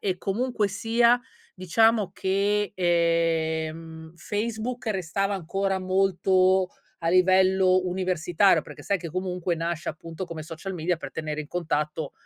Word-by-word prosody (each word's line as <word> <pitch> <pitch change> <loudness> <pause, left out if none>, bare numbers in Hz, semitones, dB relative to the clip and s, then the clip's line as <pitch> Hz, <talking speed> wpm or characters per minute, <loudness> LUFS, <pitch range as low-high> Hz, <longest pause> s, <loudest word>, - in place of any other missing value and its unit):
e 190 -2 -1
comunque 215 +2 -1
sia 235 +4 +3 0.3
diciamo 205 +3 +2
che, 200 +2 0
ehm, 165 -2 0
Facebook 225 +6 -4
restava 195 0 -1
ancora 195 +2 -1
molto 185 0 +2 0.3
a 165 - -1
livello 185 +1 +4
universitario 180 +1 +2
perché - - -12
sai 200 -2 0
che 170 -1 -7
comunque 180 0 -2
nasce 170 0 -3
appunto 165 +3 -7
come 165 -3 -7
social 165 +5 -7
media 175 +1 -1
per 160 - -8
tenere 155 -1 -4
in - - -12
contatto, 155 -2 -2
185 Hz, 125 wpm, -26 LUFS, 165-195 Hz, 0.3 s, livello